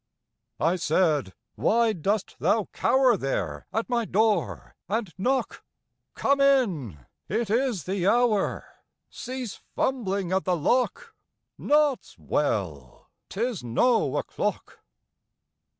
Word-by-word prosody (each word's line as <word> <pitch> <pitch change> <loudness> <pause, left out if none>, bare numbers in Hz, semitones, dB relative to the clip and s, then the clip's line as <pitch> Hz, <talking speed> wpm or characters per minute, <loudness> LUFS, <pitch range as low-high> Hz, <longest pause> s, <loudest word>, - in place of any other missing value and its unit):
I 165 +4 +2
said, 150 - +1 0.2
_Why 230 0 +2
dost 205 +3 -1
thou 220 -3 +1
cower 260 -3 +3
There 90 - -3
at 225 - -2
my 240 -2 0
door 215 +1 0
and 215 -3 -2
knock? 255 +8 -1 0.5
Come 280 0 +2
in! 175 - +1 0.2
It 215 +1 -1
is 235 - +1
the 190 +1 -1
hour! 230 -2 +2 0.5
Cease 250 -3 -6 0.2
fumbling 200 -8 -1
at 190 0 +1
the 180 -1 0
lock! 255 - 0 0.5
Naught's 295 -3 +1
well! 80 - -3 0.2
'Tis 225 - -2
no 145 - +2
o'clock! - - -3
210 Hz, 105 wpm, -26 LUFS, 165-245 Hz, 0.5 s, cower